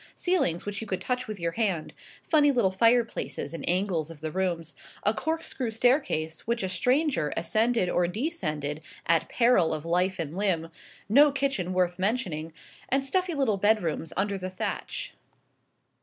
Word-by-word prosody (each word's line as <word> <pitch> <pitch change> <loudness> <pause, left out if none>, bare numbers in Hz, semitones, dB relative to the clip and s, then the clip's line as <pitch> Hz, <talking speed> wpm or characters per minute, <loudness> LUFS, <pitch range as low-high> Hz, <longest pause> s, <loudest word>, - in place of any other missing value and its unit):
Ceilings 340 - +1
which 205 +1 -4
you 225 - -6
could 190 -2 -2
touch 250 +6 -2
with 215 -2 -6
your 170 0 -1
hand; 190 -5 -1 0.3
funny 295 -3 +4
little 235 -8 +2
fireplaces 230 -2 +1
in 165 - -6
angles 180 -3 0
of 165 -2 -11
the 155 +1 -4
rooms; 175 -3 -2 0.3
a 210 - +3
corkscrew 315 0 -2
staircase, 225 - +1
which 235 -2 0
a 190 - -1
stranger 250 - +1
ascended 220 +3 +2
or 175 0 +1
descended 160 - -3 0.2
at 165 -1 +2
peril 210 -10 +3
of 155 +1 -7
life 180 +3 +1
or 165 - -1
limb; 165 0 -1 0.4
no 285 +8 +6
kitchen 270 -10 -1
worth 180 -1 0
mentioning, 185 -7 -1 0.4
and 270 +1 +1
stuffy 360 +3 0
little 255 -8 +1
bedrooms 190 -6 +1
under 200 0 0
the 185 0 -4
thatch. 185 - -4
195 Hz, 155 wpm, -27 LUFS, 170-245 Hz, 0.4 s, no